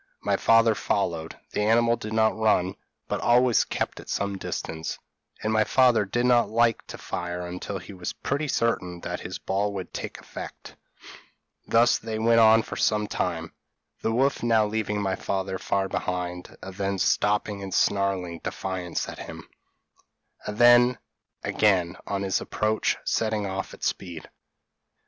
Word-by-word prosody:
My -, -, +2 dB
father 115 Hz, 0 st, +5 dB
followed; 85 Hz, -6 st, -2 dB
the -, -, -1 dB
animal 115 Hz, +2 st, +4 dB
did 110 Hz, -1 st, -6 dB
not 110 Hz, 0 st, +3 dB
run, 105 Hz, -4 st, +2 dB, 0.3 s
but -, -, -2 dB
always 120 Hz, +1 st, +4 dB
kept -, -, -3 dB
at -, -, -12 dB
some 100 Hz, 0 st, -1 dB
distance; 80 Hz, -4 st, -4 dB, 0.5 s
and 110 Hz, +1 st, 0 dB
my 110 Hz, 0 st, +4 dB
father 125 Hz, -3 st, +4 dB
did 120 Hz, +5 st, 0 dB
not 120 Hz, -1 st, +4 dB
like 115 Hz, 0 st, +2 dB
to -, -, -8 dB
fire 90 Hz, 0 st, -4 dB
until 90 Hz, +3 st, -5 dB
he 95 Hz, +2 st, -10 dB
was 90 Hz, -1 st, -4 dB
pretty 145 Hz, +3 st, -2 dB
certain 90 Hz, -9 st, -1 dB
that -, -, -4 dB
his -, -, -6 dB
ball 100 Hz, +2 st, -1 dB
would 95 Hz, -3 st, -6 dB
take -, -, -5 dB
effect; -, -, -9 dB, 0.9 s
thus 120 Hz, +1 st, +4 dB
they 110 Hz, -1 st, -4 dB
went 115 Hz, +1 st, +4 dB
on 110 Hz, 0 st, +6 dB
for -, -, -7 dB
some 105 Hz, -1 st, +2 dB
time, 85 Hz, -5 st, -3 dB, 0.5 s
the 110 Hz, -, 0 dB
wolf 135 Hz, +4 st, +1 dB
now 115 Hz, -2 st, +3 dB
leaving 105 Hz, -1 st, -1 dB
my 95 Hz, -2 st, 0 dB
father 95 Hz, -1 st, -3 dB
far 95 Hz, +1 st, 0 dB
behind, 90 Hz, -1 st, -4 dB
and 95 Hz, -, -7 dB
then 100 Hz, -1 st, -1 dB
stopping 105 Hz, +1 st, +1 dB
and 95 Hz, -1 st, -6 dB
snarling 95 Hz, -4 st, +1 dB
defiance 90 Hz, -2 st, -4 dB
at -, -, -8 dB
him, -, -, -9 dB, 1.0 s
and 105 Hz, -, -4 dB
then, 120 Hz, +1 st, +6 dB, 0.5 s
again, 95 Hz, -4 st, +2 dB
on 100 Hz, -1 st, -2 dB
his 95 Hz, -2 st, 0 dB
approach, 110 Hz, 0 st, 0 dB
setting 110 Hz, -2 st, 0 dB
off 95 Hz, 0 st, -4 dB
at -, -, -13 dB
speed. 85 Hz, -4 st, -3 dB
105 Hz, 160 wpm, -26 LUFS, 95-115 Hz, 1.0 s, on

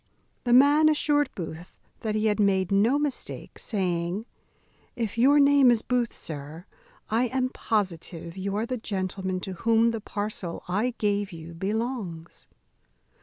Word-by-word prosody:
The 240 Hz, -, +1 dB
man 290 Hz, +4 st, +6 dB
assured 290 Hz, -1 st, +2 dB
Booth 170 Hz, 0 st, -7 dB, 0.2 s
that 215 Hz, -1 st, -2 dB
he 215 Hz, 0 st, 0 dB
had 215 Hz, 0 st, +1 dB
made 190 Hz, -2 st, +2 dB
no 215 Hz, +8 st, +4 dB
mistake; 295 Hz, -2 st, -4 dB
saying, 180 Hz, 0 st, -2 dB, 0.7 s
"If 225 Hz, -4 st, -3 dB
your 275 Hz, +5 st, +5 dB
name 280 Hz, -2 st, +6 dB
is 235 Hz, -2 st, +3 dB
Booth, 245 Hz, -2 st, -1 dB
sir, 155 Hz, +3 st, -7 dB, 0.5 s
I 230 Hz, +3 st, +3 dB
am 255 Hz, +1 st, 0 dB
positive 175 Hz, -7 st, -3 dB
you 195 Hz, +1 st, -3 dB
are 215 Hz, +2 st, 0 dB
the 255 Hz, +1 st, -3 dB
gentleman 190 Hz, -3 st, -3 dB
to 190 Hz, -, -5 dB
whom 230 Hz, +4 st, +3 dB
the 225 Hz, -1 st, -4 dB
parcel 205 Hz, -5 st, -4 dB
I 215 Hz, +7 st, 0 dB
gave 205 Hz, -1 st, 0 dB
you 165 Hz, 0 st, -9 dB
belongs." 195 Hz, -3 st, -4 dB
210 Hz, 145 wpm, -26 LUFS, 185-245 Hz, 0.7 s, man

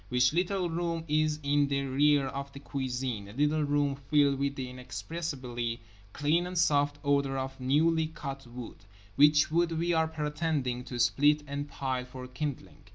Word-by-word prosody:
Which 125 Hz, +2 st, +3 dB
little 180 Hz, +1 st, +1 dB
room 170 Hz, 0 st, -2 dB
is 155 Hz, 0 st, +1 dB
in 145 Hz, 0 st, +3 dB
the 140 Hz, 0 st, -1 dB
rear 140 Hz, +1 st, +3 dB
of 140 Hz, +1 st, -5 dB
the 140 Hz, -, -8 dB
cuisine; 130 Hz, -6 st, -3 dB
a 100 Hz, -, -11 dB
little 150 Hz, +4 st, +2 dB
room 145 Hz, -1 st, +1 dB, 0.2 s
filled 145 Hz, -2 st, +4 dB
with 140 Hz, 0 st, 0 dB
the 130 Hz, -2 st, -4 dB
inexpressibly 125 Hz, -2 st, -4 dB, 0.3 s
clean 155 Hz, +7 st, +1 dB
and 180 Hz, 0 st, -5 dB
soft 145 Hz, -3 st, +3 dB
odour 140 Hz, -1 st, +1 dB
of 135 Hz, 0 st, -4 dB
newly 155 Hz, +5 st, +2 dB
cut 135 Hz, -4 st, -7 dB
wood. 120 Hz, -1 st, -8 dB, 0.4 s
Which 150 Hz, +3 st, +5 dB
wood 170 Hz, +1 st, +2 dB
we 170 Hz, +1 st, +1 dB
are 160 Hz, -1 st, +3 dB
pretending 150 Hz, -5 st, -2 dB
to 125 Hz, -, -6 dB
split 145 Hz, +6 st, +3 dB
and 145 Hz, 0 st, -4 dB
pile 130 Hz, -2 st, -2 dB
for 125 Hz, 0 st, -9 dB
kindling. 140 Hz, +2 st, -6 dB
145 Hz, 165 wpm, -30 LUFS, 130-155 Hz, 0.4 s, Which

